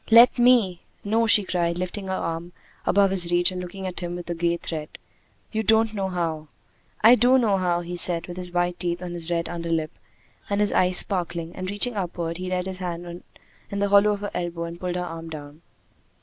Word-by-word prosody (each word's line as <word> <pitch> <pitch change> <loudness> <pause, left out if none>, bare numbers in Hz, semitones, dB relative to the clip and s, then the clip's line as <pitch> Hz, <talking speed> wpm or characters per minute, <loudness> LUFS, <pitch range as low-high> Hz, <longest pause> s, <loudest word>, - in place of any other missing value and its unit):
"Let 235 +2 +7
me!" 240 -8 +4 0.2
"No!" 225 +3 +1
she 210 -1 +6
cried, 170 -2 -1
lifting 185 +2 -4
her 190 - -2
arm 165 +1 -4 0.3
above 200 0 +4
his 175 -3 +2
reach 175 +1 +3
and 180 0 -5
looking 190 +2 -7
at 185 -1 -4
him 175 -1 -4
with 175 -1 -7
a - - 0
gay 170 0 0
threat. 155 -3 -6 0.5
"You 220 - -1
don't 220 +1 +3
know 195 -2 -2
how." 165 -4 -3 0.5
"I 225 +3 +8
do 250 +2 +5
know 215 -6 +2
how," 175 -2 0
he 175 +1 -6
said, 170 -1 +1
with 175 - -8
his 180 -1 -1
white 175 0 0
teeth 175 0 -2
on 175 -1 -5
his 170 -1 -3
red 170 -1 -1
underlip, 165 -2 -2 0.6
and 200 0 0
his 210 0 +1
eyes 180 0 +3
sparkling; 170 -3 -1
and 185 0 -4
reaching 205 +5 0
upward, 170 -3 -3
he 185 0 -5
laid 180 0 -1
his 190 -1 -4
hand 175 -1 -5 0.5
in 200 - -4
the 200 0 +1
hollow 205 +1 +5
of 205 - -5
her 205 - -4
elbow 170 -1 -3
and 170 0 -7
pulled 180 -1 -3
her 180 0 -2
arm 165 -1 -7
down. 150 0 -9
180 Hz, 220 wpm, -24 LUFS, 170-200 Hz, 0.6 s, I